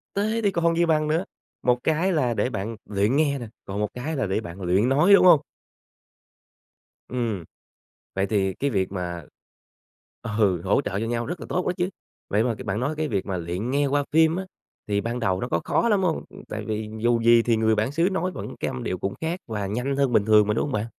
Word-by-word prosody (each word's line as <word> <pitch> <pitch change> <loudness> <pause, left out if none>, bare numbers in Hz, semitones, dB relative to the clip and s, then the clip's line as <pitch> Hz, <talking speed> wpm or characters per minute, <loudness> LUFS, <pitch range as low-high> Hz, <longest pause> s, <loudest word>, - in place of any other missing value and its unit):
Thế 215 +3 0
thì 200 - +3
còn 170 -2 +1
gì 170 - +4
bằng 155 -2 +2
nữa, 165 +5 0 0.4
một 125 0 +2
cái 165 +5 +1
là 140 -8 +1
để 125 - 0
bạn 110 +1 -4
luyện 105 +4 +1
nghe 145 -2 +2
nè, 120 - -6 0.2
còn 100 +1 -4
một 105 - +1
cái 145 +6 -4
là 130 -7 -1
để 95 +3 0
bạn 90 -2 -9
luyện 95 +7 +2
nói, 155 +9 +5
đúng 200 - +7
hông? 165 -5 +8 1.7
Ừm. 115 -7 -2 0.7
Vậy 95 +1 +1
thì 95 -3 0
cái 140 - -1
việc 95 -5 -1
mà 90 -3 -4 1.1
ừ, 95 -6 +2
hỗ 100 +8 +2
trợ 100 -7 -3
cho 115 - -2
nhau 120 0 -1
rất 175 +7 -5
là - - -7
tốt 180 - -1
đó - - +2
chứ. 175 +1 0 0.4
Vậy 105 +2 +2
mà 115 -2 0
c 130 - -9
bạn 100 0 -1
nói 140 +5 -1
cái 155 0 -1
việc 100 -8 -1
mà 95 -2 -2
luyện 90 +8 -3
nghe 140 +1 +2
qua 145 +1 +1
phim 160 +1 +4
á 190 - -3 0.4
thì 100 -1 0
ban 120 +2 -3
đầu 95 -5 0
nó - - -2
có 85 - 0
khó 235 - +1
lắm 200 -3 +2
hông? 170 -3 0
Ừm, - - -13
tại - - -5
vì 110 0 -3
dù 120 +1 +2
gì 115 0 +6
thì 115 -1 +2
người 110 0 +3
bản 110 +5 0
xứ 165 +5 +2
nói 185 0 -1
vẫn - - -7
cái - - -1
âm 65 - -5
điệu 90 - -2
cũng 95 +2 -3
khác 165 +3 -2
và 105 -3 -3
nhanh 125 +7 -2
hơn 135 -3 +1
bình 100 - +4
thường 105 -1 +5
mà, 105 - +2
đúng 115 - 0
hông 145 - -3
bạn? 105 +1 0
120 Hz, 245 wpm, -24 LUFS, 100-155 Hz, 1.7 s, hông